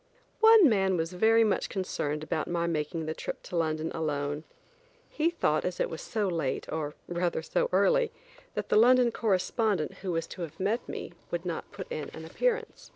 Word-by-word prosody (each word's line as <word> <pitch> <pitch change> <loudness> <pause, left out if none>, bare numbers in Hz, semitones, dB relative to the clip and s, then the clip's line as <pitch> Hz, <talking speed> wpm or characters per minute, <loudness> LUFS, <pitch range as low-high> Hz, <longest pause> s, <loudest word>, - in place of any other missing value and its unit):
One 445 -5 +8
man 190 -5 +2
was 165 +2 -2
very 225 +5 +5
much 210 -3 +1
concerned 150 -6 -2
about 155 0 -2
my 170 -1 0
making 160 0 -2
the 155 - -2
trip - - -6
to - - -7
London 160 -1 0
alone. 145 -1 -2 0.6
He 315 +2 +1
thought 240 - +1
as 180 -1 -3
it - - 0
was 160 - -5
so 215 -2 -1
late, 165 -7 -1
or 150 -1 -3
rather 175 -2 -1
so - - 0
early, - - +3 0.4
that - - -3
the - - +4
London 245 +1 +6
correspondent, 205 -4 0
who 185 -1 -2
was 165 -1 -1
to 185 - -8
have 165 -1 -6
met 210 +6 -1
me, - - -6 0.2
would 175 +1 -3
not 170 -2 -4
put - - -7
in 150 - -4
an 160 - -8
appearance. 470 - -2
175 Hz, 190 wpm, -29 LUFS, 160-225 Hz, 0.6 s, One